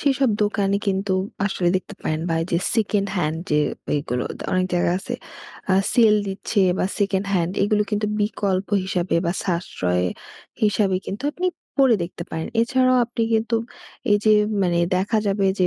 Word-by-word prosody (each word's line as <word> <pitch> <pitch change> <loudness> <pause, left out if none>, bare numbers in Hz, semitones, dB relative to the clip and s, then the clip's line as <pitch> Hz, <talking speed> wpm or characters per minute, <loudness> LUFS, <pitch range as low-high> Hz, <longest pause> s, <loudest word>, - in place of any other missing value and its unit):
সেইসব 270 -3 +2
দোকানে 200 -1 +1
কিন্তু 195 0 0 0.3
আসলে 185 -3 0
দেখতে 190 +2 -6
পারেন। 155 0 -1
বা, 165 - +1
এইযে 170 0 0 0.2
সেকেন্ড 205 -3 +1
হ্যান্ড 155 -2 0
যে, 150 0 +3 0.3
ঐগুলো। 125 -4 -1 0.3
অনেক 185 0 +2
জায়গায় 175 0 +2
আছে - - -5 0.6
আ - - +5 0.2
সেল 225 -4 +5
দিচ্ছে 195 +2 -1 0.2
বা, - - +1
সেকেন্ড 200 -1 0
হ্যান্ড, 175 -2 +1
এইগুলো 210 +1 +2
কিন্তু 210 0 0
বিকল্প 200 -2 -1 0.2
হিসাবে 185 -1 -1
বা, 170 - +1
সাশ্রয় 90 - -1 0.6
হিসাবে 200 -2 +2
কিন্তু 210 +8 -5
আপনি 360 +4 -2 0.4
পরে 250 -4 +5
দেখতে 170 0 -8
পারেন। 160 0 -3
এছাড়াও 255 +2 +3
আপনি 235 -1 -3
কিন্তু 225 +1 +1 0.6
এইযে 210 +1 +4 0.3
মানে 175 -2 +1 0.2
দেখা 200 +4 +1
যাবে 200 0 +1
যে 185 - +4
195 Hz, 155 wpm, -22 LUFS, 175-215 Hz, 0.6 s, আ